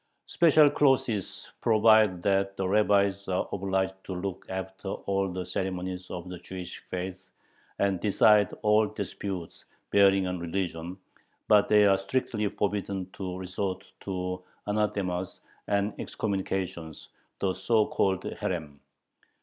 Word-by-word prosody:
Special 155 -3 +5
clauses 130 -8 +1
provide 110 -5 +4
that 100 0 +1
the 95 - -1
rabbis 100 -1 +2
are 95 -1 0
obliged 95 -1 0
"to 95 - -5
look 95 +1 -5
after 95 +1 -6
all 95 0 -1
the 90 0 -4
ceremonies 90 0 -4
of 90 0 -6
the 90 -1 -7
Jewish 90 -1 -8
faith 95 +1 -5 0.5
and 100 -2 +1
decide 105 0 +4
all 105 0 +4
disputes 100 -4 -6 0.3
bearing 100 -1 +5
on 90 -1 -3
religion," 85 0 -3 0.5
but 105 -1 +5
they 105 -1 +6
are 95 -1 +4
strictly 105 0 -1
forbidden 100 -2 -2
to 90 -2 -5
resort 95 +1 -4
to 90 -1 -4 0.3
"anathemas" 100 -4 -1 0.3
and 100 +1 +1
excommunications 95 -5 -3 0.3
(the 95 -1 0
so 105 +3 +2
called 95 -3 0
herem). 75 -5 -4
95 Hz, 125 wpm, -28 LUFS, 90-100 Hz, 0.5 s, they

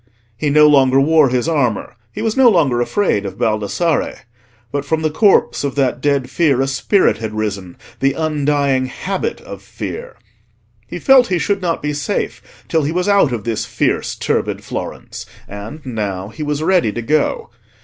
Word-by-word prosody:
He 150 +5 -1
no 150 +1 +6
longer 135 -3 +5
wore 150 0 +4
his 125 +3 0
armour, 125 -7 -1 0.2
he - - -5
was 225 -1 0
no 265 -2 +6
longer 145 - +2
afraid 120 - 0
of 95 -1 -6
Baldassarre; 110 - -1 0.5
but 145 -1 -2
from 160 +2 -1
the 155 - +1
corpse 200 0 +3
of 140 -2 -2
that 130 -3 0
dead 140 -3 +1
fear 145 -7 +1
a 135 - +2
spirit 135 - +1
had 110 -1 -5
risen—the 105 +5 -3
undying 145 -4 0
habit 195 - -4
of - - -10
fear. - - -7 0.7
He - - -6
felt 265 -2 +5
he 180 - 0
should 200 +3 -1
not 170 -4 -2
be 150 0 -1
safe 145 -3 -4
till 160 - +1
he 145 +1 -1
was 180 +3 -1
out 200 -9 +4
of 115 -4 -3
this 115 -1 -2
fierce, - - -1
turbid - - -2
Florence; - - -7 0.2
and 105 +9 -9
now 100 -6 -4
he 155 - -10
was 150 0 -2
ready 175 - +2
to 120 - -4
go. 150 -1 0
145 Hz, 175 wpm, -17 LUFS, 120-165 Hz, 0.7 s, no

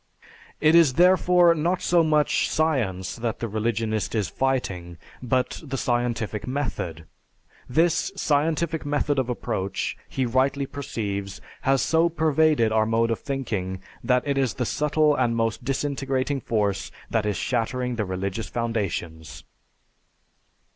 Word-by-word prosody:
It 155 - +4
is 165 -6 +6
therefore 180 -1 +5
not 170 +3 0
so 170 -1 +4
much 150 -2 +2
Science 120 - 0
that 115 -1 -2
the 115 - -3
religionist 110 0 -1
is 105 -6 0
fighting, 95 -11 -2 0.2
but 125 +1 -1
the 135 -3 -4
scientific 120 -4 -1
method. 110 - -3 0.6
This 165 +7 +2
scientific 160 0 0
method 145 -1 0
of 130 -2 -1
approach, 100 -6 -2
he 130 - -1
rightly 135 +3 +1
perceives, 100 -8 -4 0.2
has 135 0 +2
so 165 +1 +3
pervaded 155 -7 +2
our 110 0 +2
mode 115 +1 +2
of 115 - -1
thinking 105 -9 -3 0.2
that 125 -1 +2
it 140 -1 0
is 130 -4 0
the 125 - -1
subtle 150 +3 +2
and 120 -3 +1
most 115 0 -1
disintegrating 135 0 -1
force 105 -4 -1 0.2
that 110 -1 +1
is 105 -3 -1
shattering 125 0 -1
the 110 - -1
religious 95 +3 -3
foundations. 90 -9 -3
125 Hz, 135 wpm, -25 LUFS, 110-145 Hz, 0.6 s, is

